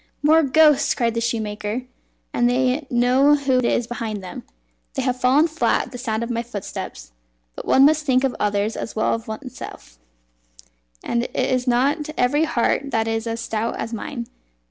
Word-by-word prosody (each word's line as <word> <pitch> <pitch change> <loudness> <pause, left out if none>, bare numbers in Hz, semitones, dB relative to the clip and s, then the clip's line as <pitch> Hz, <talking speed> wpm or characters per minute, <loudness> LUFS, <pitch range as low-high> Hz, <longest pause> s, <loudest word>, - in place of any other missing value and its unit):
"More 315 +2 +6
ghosts!" 300 0 +4
cried 230 -2 0
the 230 - -1
shoemaker, 220 0 -2 0.5
"and 240 0 +2
they 255 +3 +1
know 255 +4 +4
who 270 -3 +1
is 240 -1 +1
behind 225 -4 -5
them. 185 - -7 0.5
They - - -1
have 255 0 -1
fallen 275 +6 +4
flat 320 0 +1
at - - -14
the 245 - -8
sound 225 -2 -2
of 235 - -4
my 235 0 -1
footsteps. 200 - -7 0.4
But - - -8
one 270 - +6
must 305 +1 +3
think 260 -2 +2
of 265 -2 0
others 205 +1 0
as - - -6
well 220 - +1
as 230 -1 -4
oneself, 220 - -9 1.0
and 235 0 -1
it - - -10
is 255 0 0
not 280 +5 +1
every 290 +6 +2
heart 275 +1 0
that 225 -3 0
is 225 0 -2
as 230 0 -3
stout 225 0 -2
as 225 - -5
mine." 235 +2 -5
245 Hz, 180 wpm, -22 LUFS, 225-270 Hz, 1.0 s, More